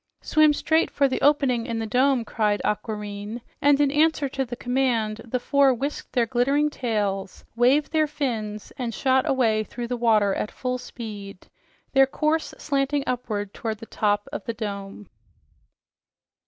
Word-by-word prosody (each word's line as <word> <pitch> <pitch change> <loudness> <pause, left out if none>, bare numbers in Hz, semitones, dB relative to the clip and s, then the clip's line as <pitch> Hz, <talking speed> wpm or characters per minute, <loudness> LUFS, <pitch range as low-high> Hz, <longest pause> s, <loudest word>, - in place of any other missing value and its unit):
"Swim 310 -1 +4
straight 320 +2 +1
for 280 - +2
the 260 - -2
opening 270 -5 +3
in 230 -2 -2
the 225 - -2
dome!" 250 +2 +2
cried 210 -2 0
Aquareine, 210 +1 -3 0.2
and 285 0 +4
in 285 -2 +3
answer 300 -1 +2
to 270 0 -2
the 245 -1 -6
command, 245 -4 0
the 250 +1 -2
four 275 0 +3
whisked 280 +5 -4
their 245 -3 +3
glittering 275 +5 +1
tails, 205 -7 -2
waved 260 +5 +3
their 310 -1 +2
fins, 230 -8 -4
and 235 -3 -3
shot 260 -1 +2
away 225 -5 +2
through 235 +2 -6
the 250 - -2
water 215 -4 +3
at 210 - -2
full 255 0 -3
speed, 210 -6 -9 0.5
their 270 0 +6
course 305 +3 -1
slanting 280 0 0
upward 215 -5 -3
toward 220 -2 -4
the 225 - -10
top 205 -1 0
of - - -4
the 230 - -3
dome. 200 -2 -6
245 Hz, 160 wpm, -24 LUFS, 215-275 Hz, 0.5 s, their